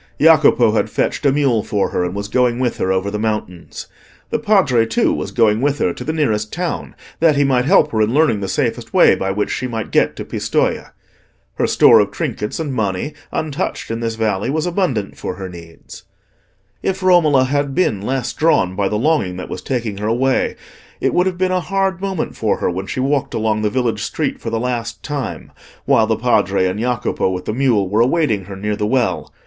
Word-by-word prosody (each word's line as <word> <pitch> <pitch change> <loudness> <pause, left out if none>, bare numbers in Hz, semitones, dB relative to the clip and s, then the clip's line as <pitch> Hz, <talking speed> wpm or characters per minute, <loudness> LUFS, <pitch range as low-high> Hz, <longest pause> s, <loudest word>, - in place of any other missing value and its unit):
Jacopo - - +5
had - - 0
fetched - - -1
a - - +4
mule 135 -6 +2
for 100 -1 -1
her, - - 0
and 90 +1 -3
was 100 0 -4
going 120 +2 +1
with 125 -2 -1
her 95 - 0
over 95 +2 -1
the 105 - -3
mountains. 105 -5 -4 0.5
The 230 - 0
Padre, 190 - +3
too, 110 - +1
was - - -3
going 110 -1 +2
with 145 +1 +1
her 90 - 0
to - - -8
the 155 - -2
nearest 110 -9 -1
town, 175 -1 -4 0.2
that 160 -2 +4
he 145 - +3
might 130 -3 +2
help 155 -2 +4
her 110 - 0
in 110 +1 +2
learning 145 -6 +2
the 100 - -3
safest 95 - -2
way - - +6
by 95 - -2
which 105 +2 -1
she 130 - -2
might 115 -3 -5
get - - +2
to - - -6
Pistoja. - - -1 0.6
Her - - 0
store - - +6
of - - +2
trinkets 105 - -4
and 150 -4 -3
money, 105 +5 -2 0.2
untouched 155 -4 -3
in 115 - -3
this 115 -1 -2
valley, 110 0 -1
was 155 +3 -1
abundant 170 - -1
for 90 - -4
her 95 0 -6
needs. 85 -2 -12 0.8
If 190 0 -2
Romola 160 -7 +4
had 140 +1 -1
been 110 - +1
less 130 +4 -2
drawn 125 - +2
by 100 0 0
the 105 - -1
longing 110 - 0
that 90 - -7
was - - -5
taking 115 -6 -3
her 105 - -2
away, 130 +4 +1 0.4
it - - 0
would 180 +1 +2
have 185 -2 -2
been 185 0 0
a 185 - +1
hard 195 -1 -1
moment 195 -4 -3
for - - 0
her - - -1
when 95 +2 -5
she - - -4
walked 135 +1 0
along 110 -1 0
the 105 - +1
village 120 +1 -1
street - - -3
for - - -4
the 115 - -1
last 115 -3 -3
time, 145 -3 -5 0.3
while - - +3
the - - 0
Padre 95 - +2
and 95 +3 -2
Jacopo, 120 -4 -1
with 90 -1 -4
the 110 - -2
mule, 120 -6 +2
were 105 +4 +1
awaiting 120 - +1
her 100 +1 -8
near 105 +2 -2
the 105 0 -2
well. 125 0 0
120 Hz, 215 wpm, -18 LUFS, 105-145 Hz, 0.8 s, way